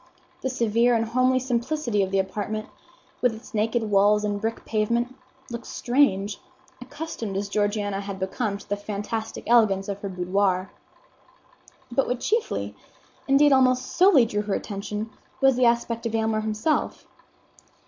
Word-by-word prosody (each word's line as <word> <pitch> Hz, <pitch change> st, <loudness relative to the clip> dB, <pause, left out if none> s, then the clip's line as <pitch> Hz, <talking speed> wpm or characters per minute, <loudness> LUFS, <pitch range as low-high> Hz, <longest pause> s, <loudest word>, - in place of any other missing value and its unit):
The 260 Hz, -, -1 dB
severe 235 Hz, -1 st, +2 dB
and 225 Hz, 0 st, +1 dB
homely 255 Hz, +3 st, +2 dB
simplicity 245 Hz, -2 st, -1 dB
of 190 Hz, -, 0 dB
the 195 Hz, -, 0 dB
apartment, 205 Hz, +3 st, -2 dB, 0.5 s
with 245 Hz, -3 st, +2 dB
its 225 Hz, +3 st, -13 dB
naked 225 Hz, +2 st, +1 dB
walls 205 Hz, +1 st, +4 dB
and 205 Hz, -1 st, -2 dB
brick 225 Hz, +1 st, -3 dB
pavement, 235 Hz, +3 st, 0 dB, 0.4 s
looked 235 Hz, 0 st, -6 dB
strange, 205 Hz, -6 st, +1 dB, 0.4 s
accustomed 255 Hz, -7 st, -5 dB
as 200 Hz, +1 st, -2 dB
Georgiana 205 Hz, -1 st, -1 dB
had 200 Hz, -1 st, -6 dB
become 200 Hz, +2 st, -2 dB
to -, -, -15 dB
the 205 Hz, -, 0 dB
fantastic 210 Hz, +2 st, -4 dB
elegance 215 Hz, -5 st, +3 dB
of 200 Hz, -1 st, -4 dB
her 200 Hz, -, -5 dB
boudoir. 185 Hz, +1 st, 0 dB, 1.2 s
But 270 Hz, +3 st, +1 dB
what 250 Hz, -1 st, -1 dB
chiefly, 450 Hz, -, -1 dB, 0.5 s
indeed 280 Hz, +1 st, +5 dB
almost 255 Hz, -1 st, +2 dB
solely, 350 Hz, -8 st, +6 dB
drew 210 Hz, -2 st, -1 dB
her 205 Hz, -1 st, -2 dB
attention, 210 Hz, +1 st, -5 dB, 0.3 s
was 270 Hz, -1 st, +4 dB
the 250 Hz, 0 st, +3 dB
aspect 235 Hz, 0 st, +1 dB
of 225 Hz, -, -3 dB
Aylmer 220 Hz, -1 st, +1 dB
himself. 215 Hz, +8 st, -1 dB
220 Hz, 150 wpm, -25 LUFS, 205-250 Hz, 1.2 s, solely